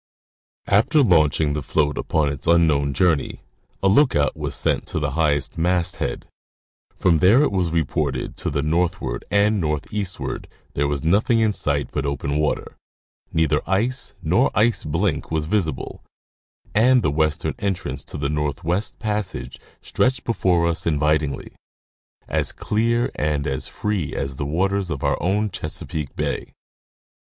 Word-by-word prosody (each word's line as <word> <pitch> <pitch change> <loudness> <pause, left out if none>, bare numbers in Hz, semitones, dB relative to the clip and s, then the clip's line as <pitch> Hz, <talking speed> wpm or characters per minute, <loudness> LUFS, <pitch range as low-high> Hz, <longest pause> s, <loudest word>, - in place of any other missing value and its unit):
After 115 +9 +4
launching 80 - +3
the 75 - -2
float 75 +1 0
upon 75 -2 0
its 70 +3 -5
unknown 80 -4 +3
journey, 80 +1 +1 0.4
a - - +4
lookout 95 - +3
was - - -4
sent - - 0
to - - -2
the 75 -2 -1
highest 75 -1 0
masthead: 90 0 0 0.7
from 85 -3 +3
there 110 - +6
it - - +1
was 90 -3 0
reported 75 -4 -1
that - - -20
to - - -1
the 70 0 -1
northward 85 -4 -1
and 100 0 +2
northeastward 90 +5 -3 0.3
there 70 +1 0
was 70 0 -2
nothing 105 +7 +3
in 110 -2 +2
sight 70 -5 0
but 75 -1 -2
open 70 +1 -2
water, 75 - -2 0.5
neither 80 -2 +2
ice 115 +8 0
nor 85 +3 +3
ice 115 +3 +3
blink 80 +1 -1
was 80 -1 -1
visible, 80 -5 -2 0.7
and 125 +2 +4
the 75 - +2
western 80 0 0
entrance 85 -9 -3
to - - -7
the 70 -1 -1
Northwest 75 - -1
passage 105 -3 -4 0.2
stretched 125 -1 0
before 90 -7 +1
us 85 0 -1
invitingly, 75 -2 0 0.8
as - - -1
clear 115 +3 0
and 75 -2 -1
as 65 -2 -2
free 105 -8 -3
as 70 -1 -3
the 70 - -3
waters 95 +4 0
of 70 -5 -4
our - - 0
own 100 +4 0
Chesapeake 75 -2 -5
bay. - - -3
80 Hz, 145 wpm, -22 LUFS, 75-100 Hz, 0.8 s, there